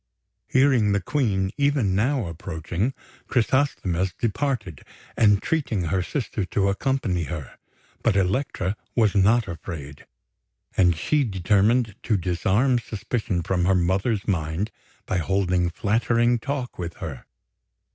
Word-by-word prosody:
Hearing 130 -6 +3
the 100 - +2
Queen 95 -4 0
even 140 -9 +2
now 120 +4 +1
approaching, 85 - -3 0.3
Chrysosthemis 100 -8 +1
departed, 115 - -2 0.3
entreating 110 - +2
her 90 +3 0
sister 110 -1 -3
to 100 +1 0
accompany 100 - 0
her; 80 -3 -7 0.4
but 115 -4 +2
Elektra 95 0 0 0.2
was 110 -4 +3
not 105 +3 +4
afraid, 80 -5 -8 0.7
and 90 -3 +4
she 145 - +1
determined 105 +2 +2
to 110 - +1
disarm 95 +9 +1
suspicion 105 -4 -3
from 90 0 0
her 95 +1 +4
mother's 95 +4 0
mind 85 +2 -1 0.3
by 95 - -1
holding 90 -1 +1
flattering 115 +6 +1
talk 135 -2 -4
with 85 -1 -4
her. 70 -6 -7
100 Hz, 115 wpm, -24 LUFS, 90-120 Hz, 0.7 s, not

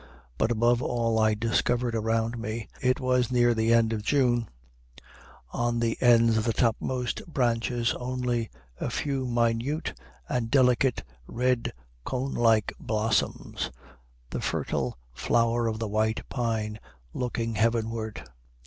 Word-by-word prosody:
But, - - +2
above 120 +1 +2
all, 115 -2 0
I 110 -1 +3
discovered 120 +2 0
around 115 +1 0
me, 110 +1 -4
it 130 0 +2
was 125 -1 +1
near 120 -1 +4
the 110 0 +1
end 115 -1 +4
of 110 - -2
June, 120 -2 +2 1.0
on 120 0 0
the 115 -1 +1
ends 115 -2 +5
of 110 - +1
the 115 0 0
topmost 125 +1 0
branches 120 -4 0
only, 125 -2 -2 0.3
a - - -2
few 135 -3 -2
minute 120 +6 0 0.3
and 115 -2 -1
delicate 125 -1 +3 0.2
red 125 0 0 0.3
cone 130 - -2
like 115 -3 +3
blossoms, 110 -1 -1 0.6
the - - -3
fertile - - -2 0.2
flower 115 - +1
of 110 -1 -1
the 110 0 -3
white 110 +1 0
pine 110 -4 -2 0.3
looking 115 -2 -2
heavenward. 115 0 -1
115 Hz, 130 wpm, -27 LUFS, 115-125 Hz, 1.0 s, ends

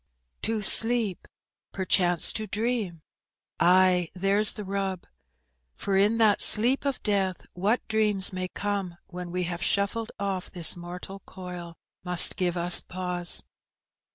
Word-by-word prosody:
^' - - -47
To 220 -1 -3
sleep! 225 -2 +3 0.4
perchance 180 -2 +2
to 215 -1 -4
dream;— 210 -7 -4 0.6
ay, 180 0 +2
there's 195 +3 +2
the 210 - -9
mb; 195 -2 -5 0.7
For 195 - -4
in 205 +4 +1
that 215 -3 +2
sleep 245 +6 +3
of 275 -2 -4
death 195 -3 -3
what 205 +7 -2
dreams 210 -3 +1
may 185 0 -5
come, 195 -3 -6
When 180 -1 -10
we 180 +1 -4
have 175 0 -6
shuffled 200 +4 -3
off 195 -2 -5
this 175 -3 +1
mortal 180 +3 -10
coil, 180 -2 -10 0.3
Must 180 -1 +5
give 180 -1 -3
us 175 +1 +8
pause. 180 -1 0
190 Hz, 135 wpm, -24 LUFS, 180-210 Hz, 0.7 s, us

